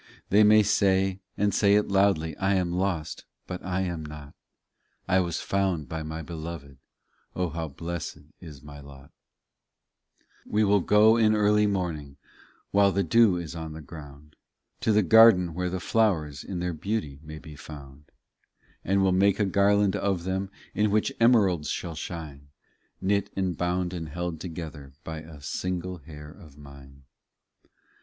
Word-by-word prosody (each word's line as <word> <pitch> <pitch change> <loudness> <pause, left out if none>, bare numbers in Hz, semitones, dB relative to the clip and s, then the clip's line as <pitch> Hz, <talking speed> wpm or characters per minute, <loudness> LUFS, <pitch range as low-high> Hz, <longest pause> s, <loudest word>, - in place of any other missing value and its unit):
They 105 +2 +6
may 105 0 +6
say, 95 -1 +2 0.2
and 100 0 +1
say 100 +1 +4
it 105 0 +2
loudly, 95 -6 +2
I 95 0 +1
am 90 -2 0
lost; 90 -4 -2 0.2
but 90 -1 -7
I 90 +1 -1
am 85 -4 -3
not; 75 -1 -10 0.7
I 95 0 +3
was 85 -3 -1
found 95 -6 -1
by 80 -1 -5
my 80 +1 -6
Beloved, 80 -4 -8 0.6
O 90 -1 -1
how 80 +1 -4
blessed 85 +3 -6 0.2
is 75 -6 -12
my 75 -1 -11
lot! 70 -1 -14 1.3
30 - - -17
We 105 +1 +2
will 100 0 +4
go 105 +4 +5
in 110 -1 +4
early 105 0 +3
morning 80 -8 -3 0.5
While 100 0 +4
the 100 +1 0
dew 100 +2 +4
is 85 -2 -6
on 80 -1 -6
the 80 - -8
ground, 75 0 -12 0.4
To 110 - +1
the 105 0 +4
garden 95 -4 +6
where 90 +2 -2
the 95 +1 -3
flowers 90 -9 0
In 95 - -6
their 90 0 -2
beauty 80 -5 -3
may 75 0 -9
be 75 -1 -11
found; 70 -1 -12 0.8
And 95 +1 +2
will 95 - +3
make 100 +2 +3
a 105 - +3
garland 100 +1 +3
of 100 -3 -1
them 95 +1 -2 0.2
In 105 0 +1
which 105 +1 +1
emeralds 100 -10 +3
shall 85 - -4
shine 75 -4 -7 0.5
Knit 100 +1 0
and 95 -2 -1
bound 90 +1 -1
and 80 -3 -5
held 85 +1 -4
together 80 -5 -8
By 80 -1 -6
a 80 -2 -12
single 90 +2 -3
hair 75 0 -11
of 75 -6 -16
mine. 70 -1 -14
90 Hz, 165 wpm, -26 LUFS, 75-100 Hz, 1.3 s, They